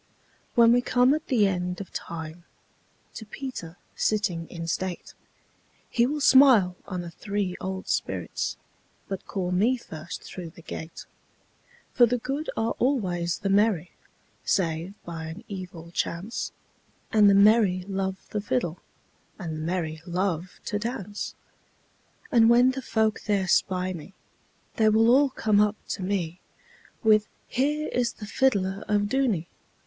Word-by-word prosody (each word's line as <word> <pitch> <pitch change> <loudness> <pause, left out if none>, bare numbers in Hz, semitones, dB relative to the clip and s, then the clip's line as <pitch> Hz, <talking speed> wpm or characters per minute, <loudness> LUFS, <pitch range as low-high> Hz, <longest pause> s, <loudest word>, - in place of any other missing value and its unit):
When 235 -1 +7
we 245 +1 +5
come 250 +2 +3
at 310 +1 -3
the 235 -7 +3
end 180 -1 -2
of 200 - -8
time, 165 0 -6 0.7
To - - -7
Peter 210 -7 -7 0.2
sitting 185 -6 0
in 165 -1 -6
state, 180 +2 -3 0.8
He 235 0 +3
will 295 +2 -2
smile 255 -10 +6
on 180 -2 -3
the 170 -1 -7
three 200 0 -3
old 190 0 -4
spirits, - - -2 0.5
But 195 -2 -5
call 180 -2 -2
me 220 +8 +3
first 160 -8 -8
through 180 -3 -7
the 170 - -14
gate; 160 0 -7 0.9
For 240 -1 +6
the 245 +2 +1
good 275 +6 -3
are 225 +1 +1
always 180 -10 0
the 195 - -2
merry, 195 -4 +2 0.5
Save 170 +1 0
by 165 -2 -6
an 165 +7 -8
evil 180 -4 -8
chance, 180 +6 -3 0.6
And 210 -2 +7
the 200 - +5
merry 200 -3 +5
love 190 -1 -3
the 210 - -1
fiddleAnd 160 -1 -1 0.6
the 180 - -6
merry 160 0 -3
love 180 0 -2
to 205 - -1
dance:And 225 +1 -3
when 245 +2 +6
the 265 +1 -5
folk 220 -4 0
there 200 -3 +1
spy 185 -1 +1
me, 175 +3 -10 0.6
They 220 -1 +5
will 225 +2 +5
all 275 +2 +5
come 215 -5 +2
up 210 0 +2
to - - -3
me, 185 -3 -2 0.6
With 215 -1 +5 0.2
'Here 295 +4 0
is 240 -1 0
the 210 - -9
fiddler 200 -4 +1
of 205 -1 +2
Dooney! 215 -6 +1
200 Hz, 145 wpm, -26 LUFS, 180-230 Hz, 0.9 s, When